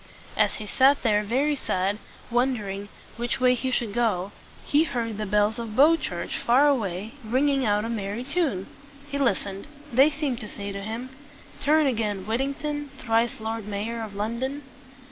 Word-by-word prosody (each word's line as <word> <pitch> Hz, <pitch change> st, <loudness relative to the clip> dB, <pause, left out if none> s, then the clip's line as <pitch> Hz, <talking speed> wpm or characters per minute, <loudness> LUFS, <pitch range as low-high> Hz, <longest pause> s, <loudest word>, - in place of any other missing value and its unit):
As -, -, +3 dB
he 215 Hz, -, -6 dB
sat 270 Hz, +7 st, +4 dB
there 210 Hz, -3 st, +3 dB
very 260 Hz, +8 st, +1 dB
sad, 190 Hz, -9 st, 0 dB
and 205 Hz, +1 st, -3 dB, 0.3 s
wondering 210 Hz, -5 st, 0 dB, 0.3 s
which 240 Hz, +2 st, -2 dB
way 250 Hz, 0 st, +5 dB
he 260 Hz, +1 st, -1 dB
should 235 Hz, -4 st, 0 dB
go, 205 Hz, -5 st, 0 dB, 0.3 s
he 295 Hz, +2 st, +4 dB
heard 230 Hz, -6 st, -3 dB
the 215 Hz, -, -2 dB
bells 210 Hz, +3 st, +2 dB
on 225 Hz, -2 st, -5 dB
Bow 300 Hz, +6 st, +7 dB
Church, -, -, -4 dB
far 260 Hz, +5 st, +4 dB
away, 215 Hz, -6 st, 0 dB
ringing 265 Hz, +3 st, +2 dB
out 210 Hz, +1 st, +2 dB
a -, -, -2 dB
merry 215 Hz, 0 st, -3 dB
chime. 275 Hz, -, 0 dB, 0.5 s
He 280 Hz, -, -1 dB
listened. 200 Hz, -5 st, 0 dB, 0.3 s
They 270 Hz, +5 st, +6 dB
seemed 285 Hz, -5 st, -2 dB
to 215 Hz, -, -4 dB
say 200 Hz, -1 st, -6 dB
to 200 Hz, 0 st, -5 dB
him, 230 Hz, +5 st, -5 dB, 0.5 s
"Turn 305 Hz, +1 st, +4 dB
again, 215 Hz, -7 st, -1 dB
Whittington, 280 Hz, +5 st, -2 dB
Thrice 230 Hz, -1 st, +1 dB
Lord 220 Hz, -1 st, -4 dB
Mayor 215 Hz, +3 st, -3 dB
of 215 Hz, -2 st, -6 dB
London." 240 Hz, +7 st, -2 dB
230 Hz, 170 wpm, -26 LUFS, 210-270 Hz, 0.5 s, Bow